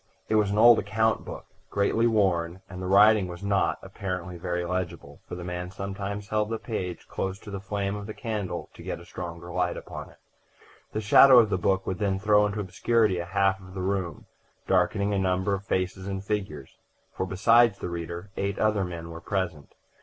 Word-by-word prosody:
It - - 0
was 105 -2 +3
an 100 - -1
old 120 +1 +8
account 110 +2 0
book, - - -8 0.2
greatly 110 +3 +2
worn; 95 -5 +1
and 90 -1 -8
the 90 - -3
writing 105 +1 +6
was 90 +2 -8
not, 100 -1 +1
apparently, 90 -2 -5
very 85 +1 -3
legible, 90 -2 -4
for - - -6
the 90 - -7
man 90 0 -4
sometimes 100 +1 -5
held 105 0 0
the 115 - -1
page 95 -7 -5
close 95 0 -3
to 105 - -11
the 100 - -4
flame 100 0 -2
of 100 -1 -6
the 110 - -7
candle 105 -8 -4
to - - -13
get - - -5
a 85 - -13
stronger 85 0 -7
light 90 -1 0
upon - - -8
it. - - -19 0.7
The 110 - -2
shadow 125 +5 +8
of 110 -3 +6
the 95 - +1
book 95 +1 +1
would 95 - -3
then 100 -2 +1
throw 105 +1 +4
into 105 +1 -4
obscurity 105 +1 +1
a 85 - -3
half 95 +1 +1
of 95 0 -13
the 95 - -3
room, 95 -4 -2 0.4
darkening 100 +2 +2
a 100 - +1
number 95 +1 +1
of 100 +1 -3
faces 95 +1 -1
and 95 -1 -4
figures; 95 -10 -4 0.3
for 95 - -3
besides 115 +3 +4
the - - -5
reader, 85 +3 -6
eight 100 +1 -1
other 105 -2 +2
men 85 -2 -6
were 85 0 -8
present. 85 -7 -3
95 Hz, 205 wpm, -27 LUFS, 90-105 Hz, 0.7 s, old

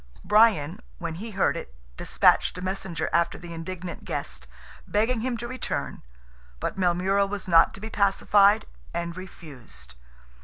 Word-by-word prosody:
Brian, 210 -7 +4 0.2
when 160 - -4
he 205 +8 -6
heard 195 -3 +1
it, - - -8 0.2
despatched - - +3
a - - -6
messenger 190 -3 -3
after 170 0 +2
the 170 -1 -9
indignant 170 +1 -6
guest, - - -5 0.4
begging 225 +3 +1
him 245 0 -1
to 240 +2 -5
return, 255 +1 -4 0.6
but - - -3
Maelmurra 190 +2 +2
was 200 -1 -5
not 165 -2 +6
to - - -10
be 220 +1 -6
pacified, 200 +1 +4 0.3
and 170 0 -3
refused. 160 -9 -11
190 Hz, 145 wpm, -26 LUFS, 170-210 Hz, 0.6 s, not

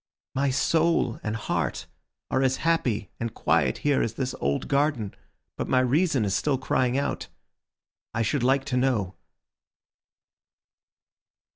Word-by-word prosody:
My 135 +1 +1
soul 160 -2 +2
and 105 +1 -3
heart 110 - -2 0.5
are 130 - +2
as 130 0 +2
happy 125 -10 +1
and 115 -1 -4
quiet - - +2
here 145 -2 +3
as 115 - -2
this 130 -1 -2
old 70 +1 -1
garden, 140 -7 +1 0.4
but - - -2
my 130 - +3
reason 135 - +2
is 95 -2 0
still 140 +6 +1
crying 130 -1 +1
out. 140 - -2 0.8
I 115 - 0
should 130 +5 0
like 135 +2 +2
to 130 -3 -1
know." 120 -8 +1
130 Hz, 135 wpm, -26 LUFS, 115-140 Hz, 0.8 s, here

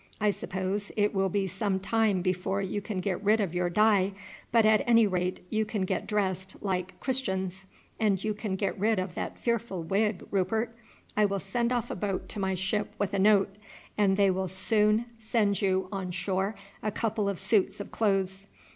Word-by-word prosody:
I 210 -1 +3
suppose 195 +1 -3
it 205 0 +2
will 195 -1 +1
be 195 +1 0
some 190 +1 -1
time 205 -2 +1
before 185 +1 0
you 200 +1 -2
can 205 -1 -5
get 195 0 -2
rid 215 +2 +4
of 195 -5 -1
your 175 0 0
dye, 200 0 +3 0.4
but 230 -1 +5
at 215 0 +5
any 230 -1 +6
rate 180 -2 -1
you 220 0 +2
can 215 -2 -2
get 185 - -2
dressed 190 -3 -1
like 185 -2 -3
Christians; 190 -7 -2 0.3
and 200 -4 +2
you 215 0 0
can 210 -2 -3
get 195 0 -2
rid 215 +2 +2
of 185 -1 -2
that - - -4
fearful 230 -7 -1
wig, 200 +3 0
Rupert. 220 +4 0 0.4
I 210 - +4
will 200 0 0
send 235 +5 -1
off 240 -3 -1
a - - -3
boat 195 0 -2
to - - -5
my 190 -1 0
ship 195 +3 -1
with 205 0 -1
a 200 - +1
note, 200 -1 +4 0.4
and 200 -2 +3
they 200 -1 +5
will 190 0 -1
soon 210 +4 +2
send 220 -3 +1
you 190 -1 +1
on 190 -2 -3
shore 190 +3 -1 0.3
a 215 - 0
couple 210 -1 -1
of 195 - -3
suits 200 0 +2
of 200 - -7
clothes. 195 -2 0
200 Hz, 195 wpm, -29 LUFS, 190-215 Hz, 0.4 s, any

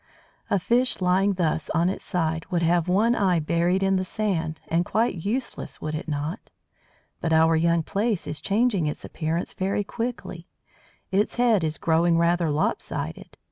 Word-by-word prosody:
A - - +3
fish 240 +7 +1
lying 190 +2 +2
thus 165 -4 -1
on 170 +1 +3
its 190 - -3
side 160 -2 -1
would 175 -2 -1
have 170 0 +2
one 210 +6 +3
eye 190 -6 +2
buried 170 +4 +1
in 195 0 +2
the 185 - 0
sand, 180 -6 -2
and 165 +1 +1
quite 200 -3 0
useless, 245 +6 -3
would 155 - -4
it 155 - -4
not? 150 +6 -4 0.7
But 165 - -2
our 160 0 +5
young 170 0 +2
Plaice 205 +2 -1
is 150 -1 -5
changing 200 -3 +1
its 150 - -4
appearance 165 +1 -3
very 195 +2 -1
quickly. 225 -7 -5 0.6
Its 200 +2 +1
head 235 -6 +3
is 155 -1 -1
growing 165 +1 +2
rather 170 0 +2
"lopsided." 150 +1 -3
175 Hz, 165 wpm, -25 LUFS, 160-200 Hz, 0.7 s, our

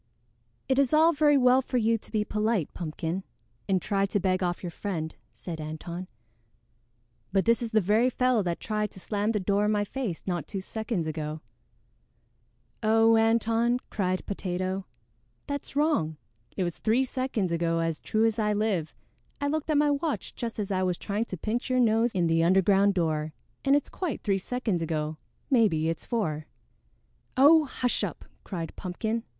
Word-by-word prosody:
"It 265 +1 +2
is 275 -1 +2
all 320 +2 +6
very 295 -1 +4
well 255 0 +5
for 255 - -2
you 230 -1 +3
to 225 - -8
be 215 -2 0
polite, 210 -6 0
Pumpkin, 165 +2 -4 0.5
and 190 -1 +3
try 195 +1 0
to 205 - 0
beg 185 0 +1
off 175 0 -1
your 175 - -4
friend," 165 -4 -4 0.2
said 165 -3 -7
Antone, 170 +4 -6 1.2
"but 195 0 +2
this 230 +1 +3
is 235 - -2
the 220 -1 +3
very 215 +6 +3
fellow 250 -2 +2
that 175 -3 -2
tried 210 -1 -1
to - - -8
slam 205 +3 -1
the 215 - 0
door 200 +2 +1
in 210 - +2
my 205 -1 +2
face 210 -6 -4
not 175 -5 -2
two 195 - -4
seconds 215 -2 -3
ago." 155 0 -4 1.4
"Oh, 225 +1 +5
Antone," 225 +1 +3
cried 185 -3 -1
Potato, 185 0 -3 0.6
"that's 285 -1 -5
wrong. 285 - +1 0.4
It 190 - +1
was 175 -2 -3
three 235 +4 +2
seconds 255 -8 -2
ago 165 0 +1
as 165 -1 -1
true 220 +1 +1
as 225 0 +1
I 210 -1 +2
live. 205 -7 -1 0.4
I 285 - -1
looked 310 +1 -2
at 305 - +3
my 295 0 +4
watch 290 +1 -2
just 235 -2 -5
as 205 -2 -3
I 185 -1 +1
was 180 -2 0
trying 210 +2 -2
to 185 - -6
pinch 225 +9 -2
your 255 0 +2
nose 230 0 +3
in 180 -3 +1
the 165 0 +3
underground 195 +3 +4
door, 155 -3 0 0.3
and 275 0 +4
it's 290 - +1
quite 350 -9 -4
three 195 -2 +1
seconds 220 -4 -2
ago; 155 -1 -2 0.3
maybe 195 - +3
it's 165 - -4
four." 160 -10 -2 0.9
"Oh, 305 +4 +7
hush 250 -2 -1
up!" - - -4 0.2
cried 170 -5 -5
Pumpkin. 220 +5 -3
210 Hz, 180 wpm, -28 LUFS, 175-235 Hz, 1.4 s, Oh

